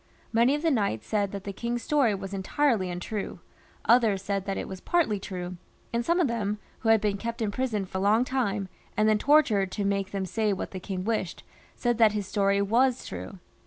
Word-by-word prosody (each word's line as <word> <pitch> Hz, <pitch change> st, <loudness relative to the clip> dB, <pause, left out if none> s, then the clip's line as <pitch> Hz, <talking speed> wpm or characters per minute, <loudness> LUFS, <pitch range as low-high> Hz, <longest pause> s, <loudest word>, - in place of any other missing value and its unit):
Many 235 Hz, +5 st, +4 dB
of 295 Hz, -, -4 dB
the 325 Hz, -, +3 dB
knights 200 Hz, -, 0 dB
said 205 Hz, -2 st, 0 dB
that 200 Hz, -1 st, -6 dB
the 200 Hz, -, -5 dB
king's 235 Hz, +3 st, -3 dB
story 275 Hz, -8 st, +2 dB
was 195 Hz, 0 st, -6 dB
entirely 195 Hz, +1 st, +1 dB
untrue; 180 Hz, +2 st, -4 dB, 0.5 s
others 220 Hz, -4 st, +4 dB
said 195 Hz, -1 st, -2 dB
that 195 Hz, -1 st, -2 dB
it -, -, -4 dB
was 190 Hz, -1 st, -7 dB
partly 305 Hz, -, +1 dB
true, 180 Hz, -2 st, -6 dB, 0.4 s
and 235 Hz, 0 st, +1 dB
some 340 Hz, +7 st, +2 dB
of 340 Hz, -, +3 dB
them, 210 Hz, -3 st, -1 dB, 0.2 s
who 225 Hz, -, -1 dB
had 225 Hz, 0 st, +6 dB
been 205 Hz, -1 st, 0 dB
kept 230 Hz, +3 st, -4 dB
in 220 Hz, -3 st, 0 dB
prison 215 Hz, -5 st, -1 dB
a 190 Hz, -, -1 dB
long 215 Hz, +5 st, +3 dB
time, 220 Hz, -7 st, -1 dB, 0.3 s
and 215 Hz, 0 st, +4 dB
then 215 Hz, -1 st, +3 dB
tortured 225 Hz, -9 st, +4 dB
to 205 Hz, -, -2 dB
make 195 Hz, -1 st, 0 dB
them 195 Hz, -2 st, -3 dB
say 215 Hz, +2 st, 0 dB
what 190 Hz, -, -4 dB
the 185 Hz, -, -5 dB
king 185 Hz, 0 st, -4 dB
wished, 210 Hz, -4 st, -2 dB, 0.3 s
said 240 Hz, -2 st, 0 dB
that 220 Hz, -2 st, +6 dB
his 205 Hz, -2 st, -2 dB
story 200 Hz, 0 st, +2 dB
was 245 Hz, +5 st, +2 dB
true. 195 Hz, -, -7 dB
210 Hz, 215 wpm, -27 LUFS, 195-235 Hz, 0.5 s, had